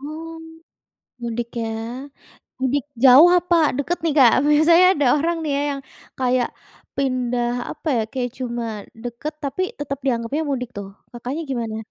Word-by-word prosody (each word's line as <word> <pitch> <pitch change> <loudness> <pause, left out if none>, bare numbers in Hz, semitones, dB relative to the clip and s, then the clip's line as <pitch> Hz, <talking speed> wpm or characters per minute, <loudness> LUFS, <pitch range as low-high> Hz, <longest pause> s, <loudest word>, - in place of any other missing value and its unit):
Oh. 320 +3 -7 0.8
Mudik, 235 0 -3
ya. 230 -1 -2 0.9
Mudik 265 +1 0 0.2
jauh 270 +6 +9
apa 355 0 +1 0.2
deket 330 +5 -1
nih, 320 - +2
Kak? 250 -5 +7
Biasanya 320 +4 +6
ada 290 - +1
orang 335 +3 0
nih 305 - -2
ya, - - 0
yang, 275 - -7 0.4
kayak 255 -1 +1 0.5
pindah, 250 -3 0 0.2
apa 300 +2 -9
ya, - - +2
kayak 250 -2 -2
cuma 240 -2 -3 0.4
deket, 245 +6 -5
tapi 280 +6 -2 0.2
tetap 275 -2 -4
dianggapnya 255 +4 0
mudik, 250 -3 -2
tuh. 200 -1 -5 0.2
Kakaknya 250 +6 -5
gimana? 230 -4 -3
265 Hz, 145 wpm, -21 LUFS, 240-300 Hz, 0.9 s, jauh